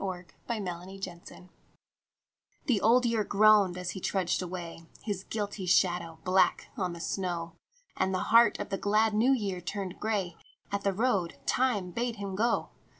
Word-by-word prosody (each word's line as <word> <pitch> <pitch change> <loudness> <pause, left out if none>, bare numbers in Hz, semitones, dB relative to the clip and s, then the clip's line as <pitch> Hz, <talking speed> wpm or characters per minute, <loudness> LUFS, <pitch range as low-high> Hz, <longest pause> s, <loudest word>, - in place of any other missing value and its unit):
BLOOD 185 -2 -5 0.2
ROAD 185 -3 -6 1.2
THE 230 -8 +2
Old 245 +3 +4
Year 230 -2 +1
groaned 205 -3 +4
as 180 0 -3
he 190 - -6
trudged 185 -1 0
away, 170 -2 -7 0.2
His 200 -4 -3
guilty 205 -3 -4
shadow 175 -2 +2
black 185 +1 +2
on 185 -7 -2
the 170 - -8
snow, 170 -2 -3 0.4
And 190 0 0
the 185 - -2
heart 235 +1 +7
of 205 - -5
the 195 - -2
glad 215 +2 +2
New 230 +5 +3
Year 200 -8 -1
turned 185 +2 -5
grey 195 -6 -2 0.3
At 200 0 -1
the 200 - +2
road 195 -4 0
Time 210 - +1
bade 235 +4 -2
him 200 -2 -5
go. 230 +5 0
195 Hz, 155 wpm, -29 LUFS, 180-215 Hz, 1.2 s, heart